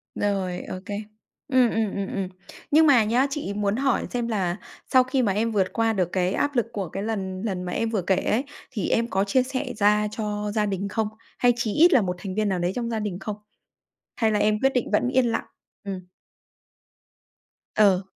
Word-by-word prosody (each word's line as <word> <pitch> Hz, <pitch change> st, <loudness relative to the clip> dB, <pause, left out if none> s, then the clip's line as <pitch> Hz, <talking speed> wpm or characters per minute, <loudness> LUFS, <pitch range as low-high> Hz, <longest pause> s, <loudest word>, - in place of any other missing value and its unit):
Rồi, 190 Hz, -3 st, -1 dB
ô 185 Hz, -, -5 dB
kê. 205 Hz, -, -4 dB, 0.5 s
Ừm, 255 Hz, -3 st, +4 dB
ừm, 220 Hz, -3 st, -1 dB
ừm, 200 Hz, -1 st, -2 dB
ừm. 195 Hz, -2 st, -1 dB, 0.4 s
Nhưng 315 Hz, +2 st, +6 dB
mà 250 Hz, -6 st, +6 dB
nhá, 245 Hz, +6 st, +2 dB
chị 275 Hz, -8 st, -3 dB
muốn 205 Hz, 0 st, 0 dB
hỏi 265 Hz, 0 st, +1 dB
xem 240 Hz, -1 st, -1 dB
là 190 Hz, -6 st, -1 dB, 0.3 s
sau 255 Hz, -1 st, +6 dB
khi 260 Hz, 0 st, 0 dB
mà 205 Hz, -5 st, +2 dB
em 225 Hz, +3 st, 0 dB
vượt 195 Hz, -3 st, 0 dB
qua 225 Hz, -1 st, +2 dB
được 185 Hz, -4 st, 0 dB
cái 185 Hz, 0 st, +1 dB
áp 290 Hz, +5 st, 0 dB
lực 240 Hz, -, +2 dB
của 195 Hz, -5 st, -3 dB
cái 195 Hz, +4 st, -4 dB
lần 190 Hz, -4 st, -3 dB
lần 185 Hz, -4 st, -2 dB
mà 180 Hz, -, -4 dB
em 230 Hz, +4 st, -1 dB
vừa 215 Hz, -4 st, 0 dB
kể 190 Hz, +2 st, +2 dB
ấy, 225 Hz, +7 st, 0 dB, 0.3 s
thì 215 Hz, -8 st, -2 dB
em 230 Hz, +1 st, +2 dB
có 195 Hz, -2 st, +1 dB
chia 250 Hz, +6 st, +2 dB
sẻ 260 Hz, 0 st, -3 dB
ra 210 Hz, +1 st, +3 dB
cho 210 Hz, -1 st, -3 dB
gia 215 Hz, -1 st, +2 dB
đình 200 Hz, -1 st, -2 dB
không? 220 Hz, +2 st, 0 dB, 0.3 s
Hay 245 Hz, -1 st, +5 dB
chí 235 Hz, -3 st, -1 dB
ít 340 Hz, +3 st, +6 dB
là 255 Hz, -, +6 dB
1 180 Hz, -2 st, -2 dB
thành 190 Hz, -1 st, -5 dB
viên 215 Hz, -1 st, +1 dB
nào 185 Hz, -, 0 dB
đấy 175 Hz, +1 st, 0 dB
trong 235 Hz, -1 st, -2 dB
gia 225 Hz, -2 st, -1 dB
đình 200 Hz, -3 st, -3 dB
không? 210 Hz, -2 st, -4 dB, 0.8 s
Hay 225 Hz, -2 st, +2 dB
là 210 Hz, -, +1 dB
em 210 Hz, 0 st, +2 dB
quyết 270 Hz, 0 st, +3 dB
định 250 Hz, -, 0 dB
vẫn 210 Hz, +4 st, +2 dB
yên 260 Hz, -1 st, +3 dB
lặng? 230 Hz, -1 st, -1 dB, 0.4 s
Ừm. 195 Hz, -2 st, -4 dB, 1.8 s
Ừ. 195 Hz, -3 st, +4 dB
210 Hz, 220 wpm, -25 LUFS, 195-240 Hz, 1.8 s, Nhưng